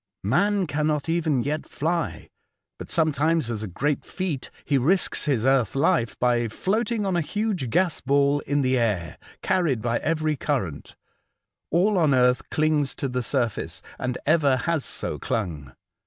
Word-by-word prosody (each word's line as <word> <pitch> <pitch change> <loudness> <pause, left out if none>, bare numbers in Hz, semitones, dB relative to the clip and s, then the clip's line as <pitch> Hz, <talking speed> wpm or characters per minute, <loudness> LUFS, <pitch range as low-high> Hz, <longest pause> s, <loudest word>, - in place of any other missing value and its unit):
Man 200 - +2
cannot 150 -1 -1
even 160 -6 +1
yet 150 +2 -3
fly, 155 - -2 0.5
but - - -8
some 160 -2 +2
times 155 -2 +1
as 110 -2 -3
a 110 - -3
great 140 +10 -1
feat 180 -8 -4 0.2
he 140 -2 +2
risks 175 +9 +2
his 130 -6 +1
earth 135 -5 +2
life 140 -4 +1
by 120 -1 +2
floating 215 - -1
on 190 -2 0
a 170 - +2
huge 205 - -2
gas 175 +4 +1
ball 140 +1 +3
in 145 -1 +1
the 130 0 +2
air, 95 -9 -1 0.2
carried 160 -10 +1
by 120 +1 -1
every 155 -1 0
current. 125 - -3 0.7
All 190 +3 +3
on 150 -5 +3
earth 125 0 +2
cliugs 150 -3 +1
to 140 - -2
the 125 -1 -2
surface, 115 - -2 0.2
and 125 -1 -2
ever 145 -4 +3
has 165 +1 -1
so - - -3
clung. 80 - -3
145 Hz, 160 wpm, -25 LUFS, 125-165 Hz, 0.7 s, ball